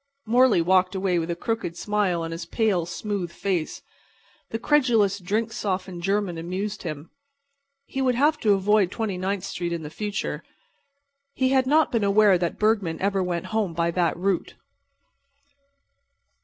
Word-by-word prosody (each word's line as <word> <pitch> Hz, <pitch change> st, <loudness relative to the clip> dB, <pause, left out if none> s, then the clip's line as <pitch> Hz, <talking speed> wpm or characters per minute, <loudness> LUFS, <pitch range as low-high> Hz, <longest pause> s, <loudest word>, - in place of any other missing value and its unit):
Morley 230 Hz, -5 st, +4 dB
walked 185 Hz, +2 st, +3 dB
away 185 Hz, -2 st, +1 dB
with 165 Hz, +1 st, -3 dB
a 170 Hz, -, -1 dB
crooked 225 Hz, -2 st, -3 dB
smile 200 Hz, -5 st, 0 dB
on 165 Hz, -, -4 dB
his 170 Hz, +1 st, -6 dB
pale, 195 Hz, -5 st, 0 dB
smooth 185 Hz, 0 st, -4 dB
face. 175 Hz, -4 st, -3 dB, 0.7 s
The 225 Hz, -, -2 dB
credulous, 225 Hz, -7 st, +2 dB
drink 215 Hz, +5 st, -2 dB
softened 185 Hz, -3 st, -3 dB
German 195 Hz, -2 st, -1 dB
amused 195 Hz, +5 st, -4 dB
him. 155 Hz, -2 st, -6 dB, 0.7 s
He 270 Hz, -, -4 dB
would 255 Hz, -2 st, +2 dB
have 295 Hz, +4 st, +2 dB
to 210 Hz, -2 st, +3 dB
avoid 200 Hz, 0 st, +3 dB
Twenty 215 Hz, -1 st, -3 dB
ninth 190 Hz, 0 st, -2 dB
street 175 Hz, -1 st, -4 dB
in 170 Hz, -1 st, -3 dB
the 150 Hz, -, -7 dB
future. 210 Hz, +3 st, -3 dB, 0.9 s
He 260 Hz, 0 st, +2 dB
had 260 Hz, -1 st, +2 dB
not 310 Hz, +3 st, +3 dB
been 230 Hz, -3 st, +1 dB
aware 200 Hz, -2 st, +4 dB
that 170 Hz, -1 st, -2 dB
Bergman 210 Hz, -7 st, +1 dB
ever 195 Hz, 0 st, +1 dB
went 180 Hz, +2 st, -3 dB
home 205 Hz, -7 st, 0 dB
by 170 Hz, 0 st, +1 dB
that 170 Hz, -1 st, 0 dB
route. 185 Hz, 0 st, -1 dB
195 Hz, 155 wpm, -25 LUFS, 175-215 Hz, 0.9 s, Morley